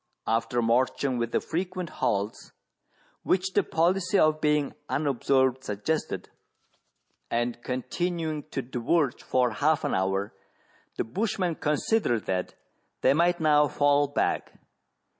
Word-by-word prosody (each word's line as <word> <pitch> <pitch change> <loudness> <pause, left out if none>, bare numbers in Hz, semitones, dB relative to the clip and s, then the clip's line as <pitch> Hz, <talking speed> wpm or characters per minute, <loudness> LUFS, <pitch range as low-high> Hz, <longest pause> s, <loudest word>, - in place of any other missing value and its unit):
After 115 +1 0
marching 125 +2 +1
with 115 0 -2
the - - +2
frequent 180 +1 -4
halts 100 +2 -1 0.7
which 190 0 0
the 205 - +4
policy 180 +3 +1
of 155 -2 +3
being 150 -1 +1 0.2
unobserved 130 -2 +1
suggested, 105 +11 -2 1.0
and 120 0 -1
continuing 155 +5 -3
to 135 - -3
diverge 130 +3 0
for 125 -2 +1
half 150 +6 +1
an - - -1
hour, 95 +1 0 0.6
the - - -1
bushman 185 - -1
considered 150 - 0
that 90 -1 -2 0.5
they - - +5
might 175 +3 +2
now 150 -2 +4
fall 145 +1 +3
back. 145 - -1
145 Hz, 120 wpm, -27 LUFS, 120-165 Hz, 1.0 s, they